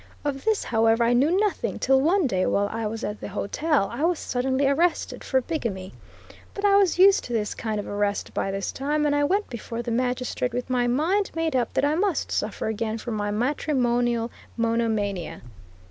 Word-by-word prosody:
Of 275 -2 -3
this 440 -1 +2
however 225 0 +2
I 235 +1 +3
knew 300 +10 +3
nothing, 420 -2 -1
till 265 0 +3
one 350 +4 +3
day, 185 -7 +1
while 200 0 +1
I 225 -1 -2
was 225 +2 -5
at 210 +1 -4
the - - -5
hotel, 210 - 0
I 260 +6 -3
was 345 0 +2
suddenly 260 +2 -1
arrested 330 +5 0
for 260 -1 +1
bigamy. 230 - -4 0.6
But 400 - -2
I 400 -1 +5
was 395 -4 +3
used 385 +1 +6
to 240 - -5
this 210 -2 -1
kind 215 -2 -3
of 205 - -4
arrest 205 0 -2
by - - -1
this 195 0 -3
time, 300 +2 -1
and 290 -1 +2
I 290 - +2
went 395 +8 +1
before 235 0 -5
the 235 - -4
magistrate 250 0 -1
with 250 +1 -3
my 245 -1 +2
mind 330 +11 +1
made 325 -3 -1
up 245 -3 0
that - - +2
I 290 - +2
must 365 0 0
suffer 210 - -2
again 220 0 -2
for 235 +1 -6
my 205 -1 -2
matrimonial 240 -1 0 0.3
monomania. 220 -6 -1
245 Hz, 200 wpm, -25 LUFS, 225-300 Hz, 0.6 s, used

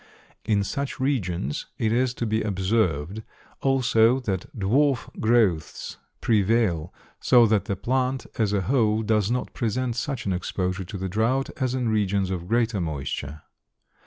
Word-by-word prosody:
In 105 -2 +2
such 140 +7 -4
regions 90 - -1
it 110 - 0
is 125 +1 +1
to 120 - -2
be 110 0 0
observed 95 -3 0 0.4
also 125 -2 +3
that 95 -6 -3
dwarf 125 +6 +2
growths 110 -8 +1 0.2
prevail, 100 -6 +2 0.3
so 120 -2 +6
that 105 -3 +2
the 100 - -2
plant, 130 +4 -1
as 105 -3 +2
a 100 -1 +1
whole, 110 0 +2
does 105 -2 +1
not 125 +1 -2
present 120 +1 -1
such 130 +1 -3
an 95 - 0
exposure 90 +1 -2
to 100 - -7
the 95 0 -3
drouth 115 +8 0
as 130 0 0
in 125 -2 -1
regions 100 -3 +1
of 90 -2 -4
greater 115 -2 +1
moisture. 75 -1 -4
110 Hz, 150 wpm, -25 LUFS, 95-120 Hz, 0.4 s, so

